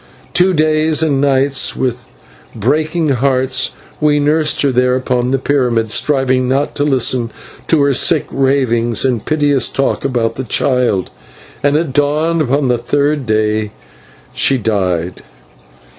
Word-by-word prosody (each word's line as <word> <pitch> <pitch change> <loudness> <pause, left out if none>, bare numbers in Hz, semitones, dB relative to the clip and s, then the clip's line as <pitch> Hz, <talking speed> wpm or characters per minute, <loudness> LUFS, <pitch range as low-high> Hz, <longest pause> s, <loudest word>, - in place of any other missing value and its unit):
Two 185 +2 +3
days 155 -1 +1
and 140 -4 +1
nights, 135 -1 +1
with 125 -2 -3 0.5
breaking 155 +8 0
hearts, 130 0 0 0.3
we 150 -1 +2
nursed 150 +1 +1
her 140 - +2
there 125 0 +2
upon 125 -1 -1
the 135 - +1
pyramid, 125 -5 0
striving 130 -1 +1
not 140 +2 0
to 145 - +1
listen 130 -4 +1 0.4
to 155 -3 +3
her 140 -1 +2
sick 155 +4 +1
ravings 130 -4 +1
and 120 -5 0
piteous 145 -4 +1
talk 135 - -1
about 120 -4 -1
the 130 - -3
child, 125 -6 0 0.5
and 145 +2 +2
at 155 -4 -2
dawn 150 +4 +1
upon 140 0 0
the 120 -1 +1
third 145 +2 -1
day 110 0 0 0.6
she 135 - +1
died. 95 -6 -2
135 Hz, 140 wpm, -15 LUFS, 125-145 Hz, 0.6 s, Two